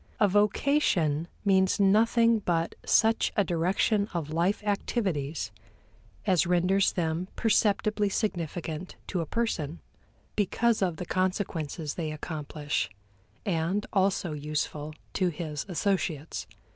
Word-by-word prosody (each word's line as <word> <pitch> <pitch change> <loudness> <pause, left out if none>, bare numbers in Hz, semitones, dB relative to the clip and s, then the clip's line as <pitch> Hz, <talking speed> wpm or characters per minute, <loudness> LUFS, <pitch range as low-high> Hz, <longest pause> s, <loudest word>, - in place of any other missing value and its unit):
A 210 - +5
vocation 200 - +2 0.2
means 190 -1 +3
nothing 230 +3 +4
but 170 -4 0
such 225 0 +3
a 205 - +5
direction 190 +4 +1
of 155 -3 -2
life 180 +6 +1
activities 190 - -1 0.7
as 185 -6 +3
renders 180 +3 +3
them 165 +1 -1
perceptibly 210 -1 +2
significant 175 -4 -3
to 180 - -2
a 165 - -4
person, 170 -9 -2 0.6
because 220 +3 +2
of 175 -4 0
the 180 - -4
consequences 175 -5 -1
they 160 -3 -3
accomplish, 150 -1 -3 0.6
and 185 +2 0
also 190 -4 +1
useful 150 0 -3 0.2
to 185 - +1
his 155 -2 -5
associates. 175 -4 -1
180 Hz, 110 wpm, -28 LUFS, 160-205 Hz, 0.7 s, A